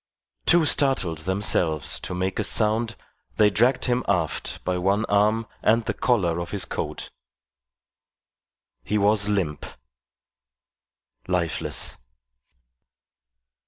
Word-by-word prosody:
Too 170 -2 +5
startled 130 - +1
themselves 85 -4 0
to 90 - -6
make 95 +1 -2
a - - +1
sound, 110 +1 +2 0.4
they 105 -1 +5
dragged 125 +6 +2
him 125 0 0
aft 90 -6 -1
by 90 0 -1
one 100 +4 +1
arm 105 +2 +2 0.2
and 115 +1 +2
the 110 - -1
collar 90 -11 +1
of 85 0 -5
his 100 -2 -3
coat. - - -5 1.7
He 105 - -1
was 105 0 +3
limp 90 -8 -1 1.6
lifeless. 90 -3 -2
100 Hz, 105 wpm, -24 LUFS, 90-110 Hz, 1.7 s, Too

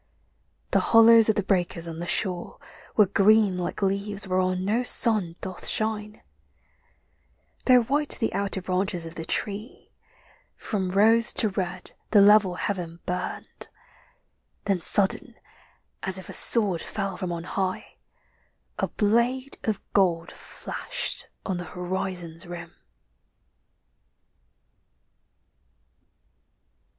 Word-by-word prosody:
The - - +3
hollows 225 -1 +6
of 215 - +3
the 205 - 0
breakers 175 -3 0
on 165 0 -7
the 175 - -5
shore 180 -3 -1 0.4
Were 210 - +7
green 200 +1 +3
like 180 +2 -4
leaves 200 +1 -2
whereon 185 0 0
no 220 +5 +1
sun 215 -8 +3
doth 185 -1 -5
shine, 215 -1 -1 1.4
Though 250 -1 +5
white 290 +5 -1
the 225 - -1
outer 200 -2 -2
branches 185 -1 -2
of 165 - -8
the 165 - -7
tree 210 +7 -4 0.7
From 190 -4 -3
rose 225 +5 +4
to 215 - +3
red 185 -2 -5 0.2
the 210 - +5
level 200 -2 +5
heaven 175 -3 -4
burned; 180 0 -5 1.0
Then 195 -3 0
sudden, 195 +3 +2 0.7
as 190 0 -1
if 190 - -10
a - - -7
sword 200 -8 +3
fell 195 -2 -4
from 180 -1 -4
on 170 -1 -5
high, 185 +1 -4 0.8
A - - 0
blade 240 +5 0
of 215 -3 -1
gold 175 -4 +1
flashed - - -5 0.2
on 190 -3 -2
the 175 - -6
horizon's 180 -1 -4
rim. 170 -1 -9
195 Hz, 115 wpm, -25 LUFS, 180-215 Hz, 1.4 s, Were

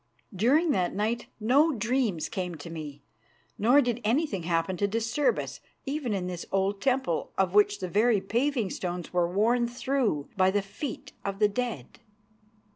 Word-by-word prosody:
During 285 - +3
that 180 -5 0
night 220 +4 -1
no 275 +9 +4
dreams 230 - 0
came 180 -5 -4
to 160 +2 -9
me, 150 -3 -7 0.6
nor 245 +7 +5
did 240 -2 -1
anything 230 - +1
happen 165 +2 0
to 200 - +1
disturb 230 +6 +1
us, - - -5 0.3
even 275 -3 -2
in 190 -3 -1
this 180 -1 -4
old 195 +1 0
temple, 260 -11 0
of 190 -1 +1
which 205 0 +4
the 185 - -2
very 215 +4 +3
paving 235 +1 0
stones 175 -1 -4
were 175 -1 +1
worn 235 +5 +2
through 245 - -1
by 185 -1 +4
the 200 +1 +1
feet 225 +7 -7
of 195 -1 -3
the 210 0 +4
dead. 240 +2 -4
210 Hz, 165 wpm, -28 LUFS, 185-245 Hz, 0.6 s, nor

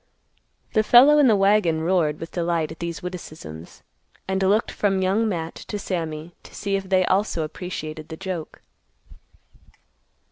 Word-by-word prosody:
The 215 - +4
fellow 265 +7 +7
in 285 - +6
the 220 - +5
wagon 195 -5 +3
roared 165 -3 +1
with 165 - -7
delight 170 -3 -1
at 160 - -10
these 170 0 -5
witticisms, 155 - -9 0.4
and 190 0 -1
looked 200 +4 +2
from 195 -2 0
Young 210 +4 +1
Matt 165 -4 -3
to 210 - -3
Sammy 165 -4 -4
to - - -15
see 200 -1 -2
if 195 -1 -4
they 185 -1 +3
also 190 -4 +1
appreciated 155 -1 -6
the 160 - -7
joke. 185 -4 -6
180 Hz, 150 wpm, -23 LUFS, 160-195 Hz, 0.4 s, fellow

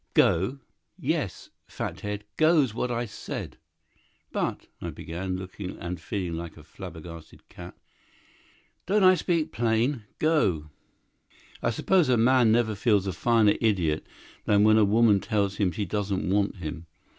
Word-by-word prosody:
"Go?" 95 +11 +3 0.4
"Yes—fathead! 105 0 -4
Go's 155 -7 +3
what 125 +2 -2
I 120 0 -1
said." 105 - -7 0.7
"But—" - - -2 0.2
I - - -4
began, 90 +3 -5
looking 95 0 -7
and 85 -1 -5
feeling 90 -3 -3
like 85 -1 -8
a 75 - -13
flabbergasted 85 -2 -11
cat. - - -11 1.1
"Don't 205 +2 +3
I 185 0 +8
speak 165 -2 0
plain? 115 +1 0
Go!" 95 - +1 0.9
I - - +1
suppose 170 - +2
a 125 - +4
man 120 0 +4
never 115 -1 +2
feels 105 -1 +2
a 95 - -2
finer 110 +3 +3
idiot 90 -9 +1 0.4
than 105 0 +4
when 110 +1 +6
a 105 - +5
woman 105 0 +4
tells 100 -2 -1
him 95 -4 +1
she 100 +5 -3
doesn't 100 0 -2
want 100 +2 +1
him. 85 -2 -7
105 Hz, 140 wpm, -27 LUFS, 90-120 Hz, 1.1 s, I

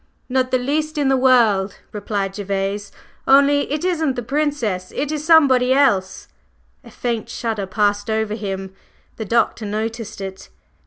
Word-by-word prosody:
"Not 255 0 +1
the 255 - +2
least 300 +5 -2
in 285 -2 +1
the 270 - +4
world," 235 -7 +3
replied 200 -2 -3
Gervase, 200 0 -3 0.4
"only 280 +1 +4
it 300 +3 -2
isn't 320 -7 0
the 245 - -4
Princess, 245 -9 -2
it 290 +1 -2
is 305 -1 -3
somebody 270 -6 +5
else." 200 -9 +1 0.6
A - - -13
faint 235 -3 -3
shudder 220 -5 -3
passed 205 +1 0
over 220 -1 -1
him. 195 -3 -5 0.4
The 220 - -4
Doctor 230 0 +1
noticed 220 +1 -4
it. 190 -1 -8
230 Hz, 150 wpm, -20 LUFS, 205-275 Hz, 0.6 s, somebody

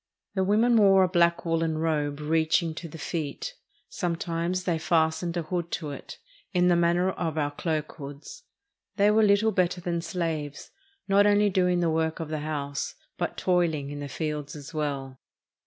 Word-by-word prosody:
The 190 - +1
women 225 +5 +4
wore 195 -3 +6
a - - +3
black 170 -1 +2
woolen 165 -1 0
robe 150 -2 -1
reaching 160 +2 +1
to 165 +2 -7
the 165 - -9
feet. 160 - -4 0.3
Sometimes 175 - -2
they 170 -3 0
fastened 160 +1 +1
a 170 - -1
hood 170 +1 -3
to 150 -4 -3
it 140 - -9 0.4
in 180 -1 +4
the 175 - +5
man 170 0 +3
ner 180 +2 +2
of 160 -4 -3
our 145 -1 0
cloak 155 0 -2
hoods. 145 - -9 0.5
They 205 +1 +4
were 220 +1 +4
little 210 +1 +4
better 180 -2 +1
than 170 -1 -2
slaves, 160 -6 -4 0.4
not 200 +1 +5
only 205 0 +4
doing 180 -1 +2
the 170 - +2
work 160 0 0
of 160 -2 -4
the 155 -1 -2
house, 145 -2 -3 0.2
but - - -2
toiling 165 -6 +1
in 145 - -6
the 145 -1 -5
fields 150 +1 -4
as 145 0 -9
well. 140 -4 -3
165 Hz, 180 wpm, -27 LUFS, 155-180 Hz, 0.5 s, wore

